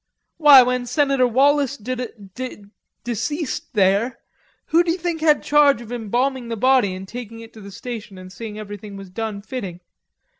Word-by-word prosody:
"Why, 290 Hz, -5 st, +9 dB
when 250 Hz, 0 st, -1 dB
Senator 275 Hz, 0 st, +2 dB
Wallace 280 Hz, +2 st, +2 dB
d 240 Hz, +4 st, -4 dB, 0.4 s
d 250 Hz, -3 st, -7 dB, 0.4 s
deceased 260 Hz, -, -3 dB
there, 205 Hz, +5 st, +2 dB, 0.5 s
who 335 Hz, +2 st, +3 dB
d'you 340 Hz, +1 st, 0 dB
think 340 Hz, -2 st, -3 dB
had 305 Hz, -2 st, +3 dB
charge 290 Hz, -4 st, +4 dB
of 235 Hz, -1 st, -10 dB
embalming 245 Hz, +2 st, -1 dB
the 230 Hz, -1 st, -4 dB
body 250 Hz, -5 st, +3 dB
and 190 Hz, +1 st, -8 dB
taking 230 Hz, 0 st, -8 dB
it 225 Hz, 0 st, -12 dB
to 220 Hz, -, -12 dB
the 200 Hz, -, -10 dB
station 210 Hz, -1 st, -8 dB
an' 185 Hz, 0 st, -11 dB
seeing 215 Hz, +1 st, -8 dB
everything 205 Hz, -1 st, -8 dB
was 195 Hz, -2 st, -11 dB
done 215 Hz, 0 st, -4 dB
fitting? 200 Hz, -8 st, -6 dB
240 Hz, 165 wpm, -21 LUFS, 205-275 Hz, 0.5 s, Why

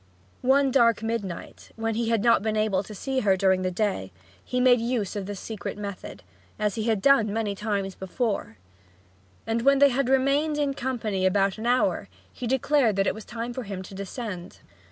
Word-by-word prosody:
One 270 Hz, +1 st, +3 dB
dark 230 Hz, -3 st, +3 dB
midnight, 225 Hz, -6 st, -5 dB
when 225 Hz, 0 st, -2 dB
he 230 Hz, +1 st, -1 dB
had 225 Hz, -3 st, +1 dB
not 235 Hz, -3 st, +5 dB
been 215 Hz, 0 st, -1 dB
able 215 Hz, -3 st, +1 dB
to 210 Hz, +2 st, -10 dB
see 265 Hz, +5 st, -2 dB
her 195 Hz, -5 st, +3 dB
during 190 Hz, 0 st, +3 dB
the 185 Hz, -, 0 dB
day, 200 Hz, +2 st, -2 dB, 0.3 s
he 250 Hz, -, -2 dB
made 250 Hz, -2 st, +5 dB
use 230 Hz, -5 st, -1 dB
of 200 Hz, -2 st, -4 dB
this 205 Hz, -2 st, -5 dB
secret 220 Hz, -2 st, -6 dB
method, 200 Hz, -, -7 dB, 0.3 s
as 210 Hz, -1 st, 0 dB
he 220 Hz, +1 st, -3 dB
had 220 Hz, -4 st, 0 dB
done 235 Hz, -7 st, +5 dB
many 215 Hz, -1 st, -1 dB
times 200 Hz, -1 st, -2 dB
before; 190 Hz, -, -3 dB, 0.9 s
and 225 Hz, +1 st, 0 dB
when 275 Hz, +3 st, +5 dB
they 280 Hz, +1 st, +6 dB
had 265 Hz, 0 st, 0 dB
remained 275 Hz, +3 st, +2 dB
in 285 Hz, -2 st, 0 dB
company 230 Hz, -8 st, -2 dB
about 195 Hz, +2 st, +2 dB
an 230 Hz, -, -3 dB
hour 195 Hz, -, +1 dB, 0.2 s
he 245 Hz, -, -5 dB
declared 265 Hz, -2 st, +2 dB
that 195 Hz, 0 st, +2 dB
it -, -, +1 dB
was 220 Hz, 0 st, -10 dB
time 235 Hz, +1 st, -5 dB
for 255 Hz, -, -4 dB
him 195 Hz, -4 st, -6 dB
to 190 Hz, -, -11 dB
descend. 195 Hz, -1 st, -6 dB
220 Hz, 195 wpm, -26 LUFS, 200-250 Hz, 0.9 s, they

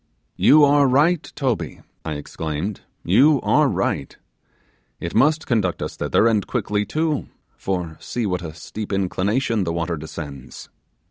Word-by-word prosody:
'You 150 Hz, +1 st, +6 dB
are 145 Hz, 0 st, +4 dB
right, 150 Hz, +6 st, +3 dB
Toby,' 135 Hz, -7 st, -2 dB, 0.2 s
I 80 Hz, -, -3 dB
exclaimed, 80 Hz, +5 st, -4 dB, 0.2 s
'you 140 Hz, -, +5 dB
are -, -, +3 dB
right; 70 Hz, -, -2 dB, 0.8 s
it 85 Hz, -, -5 dB
must 150 Hz, +6 st, +3 dB
conduct 105 Hz, -8 st, 0 dB
us -, -, -5 dB
thither, -, -, +2 dB
and 110 Hz, -3 st, +1 dB
quickly 105 Hz, -4 st, -1 dB
too; 155 Hz, +4 st, -1 dB, 0.3 s
for, 90 Hz, -4 st, -3 dB
see 120 Hz, -2 st, -3 dB
with 90 Hz, -2 st, -1 dB
what 85 Hz, -, -5 dB
a -, -, -18 dB
steep 105 Hz, +5 st, -7 dB
inclination 100 Hz, +4 st, 0 dB
the 85 Hz, -, -2 dB
water 85 Hz, 0 st, -2 dB
descends. 75 Hz, -3 st, -9 dB
105 Hz, 145 wpm, -22 LUFS, 85-135 Hz, 0.8 s, You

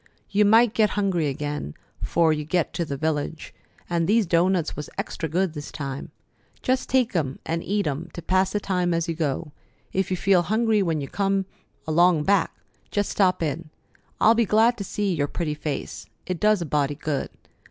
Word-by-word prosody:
"You 205 Hz, +1 st, +4 dB
might 225 Hz, +2 st, +5 dB
get 215 Hz, -2 st, +3 dB
hungry 185 Hz, -6 st, +1 dB
again 145 Hz, -, -4 dB, 0.3 s
'fore 165 Hz, -2 st, +2 dB
you 150 Hz, 0 st, -3 dB
get 165 Hz, +2 st, 0 dB
to 170 Hz, -, -1 dB
the 140 Hz, -3 st, -4 dB
village, 155 Hz, +1 st, -2 dB, 0.3 s
and 170 Hz, -1 st, 0 dB
these 220 Hz, +2 st, +3 dB
doughnuts 170 Hz, 0 st, +2 dB
was 150 Hz, -, -6 dB
extra 160 Hz, -, -3 dB
good 180 Hz, +1 st, 0 dB
this 150 Hz, -2 st, -7 dB
time. 135 Hz, -2 st, -5 dB, 0.5 s
Just 255 Hz, 0 st, 0 dB
take 255 Hz, -5 st, +2 dB
'em 140 Hz, -5 st, -1 dB
an' 165 Hz, +1 st, -1 dB
eat 205 Hz, +3 st, -1 dB
'em 150 Hz, +4 st, -3 dB
to 170 Hz, -, -7 dB
pass 185 Hz, 0 st, +2 dB
the 210 Hz, -, 0 dB
time 180 Hz, -3 st, 0 dB
as 165 Hz, -1 st, -1 dB
you 165 Hz, -, -1 dB
go. 155 Hz, -1 st, -2 dB, 0.4 s
If 190 Hz, 0 st, 0 dB
you 185 Hz, -, -1 dB
feel 190 Hz, -1 st, +4 dB
hungry 215 Hz, +4 st, +2 dB
when 165 Hz, -5 st, 0 dB
you 140 Hz, -, -4 dB
come 195 Hz, +1 st, 0 dB, 0.4 s
along 165 Hz, 0 st, +4 dB
back, 195 Hz, +1 st, +2 dB, 0.4 s
just 205 Hz, -1 st, -1 dB
stop 185 Hz, -4 st, +2 dB
in. 155 Hz, +1 st, -3 dB, 0.5 s
I'll 225 Hz, -, +6 dB
be 230 Hz, 0 st, +2 dB
glad 225 Hz, +4 st, +4 dB
to -, -, -2 dB
see 200 Hz, 0 st, -1 dB
your 145 Hz, -3 st, 0 dB
pretty 155 Hz, 0 st, -2 dB
face. 145 Hz, -8 st, -5 dB, 0.2 s
It 180 Hz, -2 st, -3 dB
does 210 Hz, -4 st, +3 dB
a -, -, -5 dB
body 145 Hz, -1 st, 0 dB
good. 145 Hz, -2 st, -2 dB
170 Hz, 195 wpm, -24 LUFS, 150-200 Hz, 0.5 s, I'll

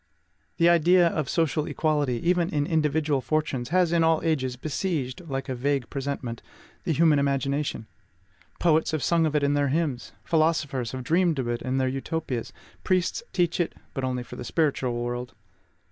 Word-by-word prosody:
The 170 Hz, -, +4 dB
idea 170 Hz, +1 st, +5 dB
of 155 Hz, -5 st, -2 dB
social 155 Hz, -2 st, 0 dB
equality, 145 Hz, -4 st, 0 dB
even 175 Hz, -1 st, +2 dB
in 145 Hz, -1 st, 0 dB
individual 150 Hz, -2 st, +1 dB
fortunes, 140 Hz, -5 st, -1 dB
has 180 Hz, 0 st, +3 dB
in 170 Hz, -1 st, +3 dB
all 160 Hz, -1 st, +3 dB
ages 135 Hz, -6 st, 0 dB
besieged, 150 Hz, 0 st, -3 dB
like 135 Hz, 0 st, -3 dB
a 130 Hz, -, -2 dB
vague 135 Hz, 0 st, -1 dB
presentiment, 135 Hz, -4 st, -4 dB, 0.4 s
the -, -, 0 dB
human 155 Hz, -1 st, +4 dB
imagination. 140 Hz, -2 st, -1 dB, 0.7 s
Poets 160 Hz, -2 st, +3 dB
have 155 Hz, -, -1 dB
sung 165 Hz, -2 st, +3 dB
of 155 Hz, -, -3 dB
it 150 Hz, -, +2 dB
in 140 Hz, 0 st, +2 dB
their 145 Hz, -1 st, +2 dB
hymns; 140 Hz, -3 st, -1 dB
philosophers 155 Hz, -7 st, 0 dB
have 130 Hz, -1 st, -4 dB
dreamed 165 Hz, +3 st, +2 dB
of 130 Hz, -3 st, -2 dB
it 120 Hz, 0 st, -2 dB
in 130 Hz, +1 st, -1 dB
their 130 Hz, -1 st, +1 dB
Utopias; 135 Hz, -1 st, -3 dB, 0.3 s
priests 185 Hz, -, +1 dB
teach 175 Hz, -1 st, 0 dB
it, 170 Hz, -, 0 dB, 0.2 s
but 135 Hz, -, -3 dB
only 125 Hz, -1 st, -1 dB
for -, -, -10 dB
the -, -, -6 dB
spiritual 135 Hz, -3 st, 0 dB
world. 120 Hz, +1 st, -4 dB
145 Hz, 175 wpm, -26 LUFS, 130-165 Hz, 0.7 s, idea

